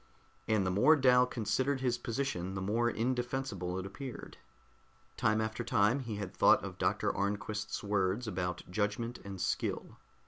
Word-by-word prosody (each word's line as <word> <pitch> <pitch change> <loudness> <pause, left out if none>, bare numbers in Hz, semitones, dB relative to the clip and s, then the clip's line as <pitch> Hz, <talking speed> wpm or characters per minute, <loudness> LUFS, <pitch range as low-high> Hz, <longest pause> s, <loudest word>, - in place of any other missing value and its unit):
And 110 -3 +2
the 90 - +1
more 105 +12 +6
Dal 125 -3 +5
considered 130 +4 0
his 120 -2 0
position, 115 -8 -2
the - - -2
more 115 +4 +1
indefensible 120 -6 -2
it 95 - -4
appeared. 130 +6 -8 0.8
Time 110 0 +2
after 110 0 -2
time 105 +7 +3
he 115 -5 -4
had 100 -2 -5
thought - - +5
of - - -7
Dr. - - +1
Arnquist's 105 +2 -2
words 100 +2 0
about 90 -3 -3
judgment 105 +5 -2
and 100 -1 -7
skill. - - -2
110 Hz, 150 wpm, -32 LUFS, 100-125 Hz, 0.8 s, more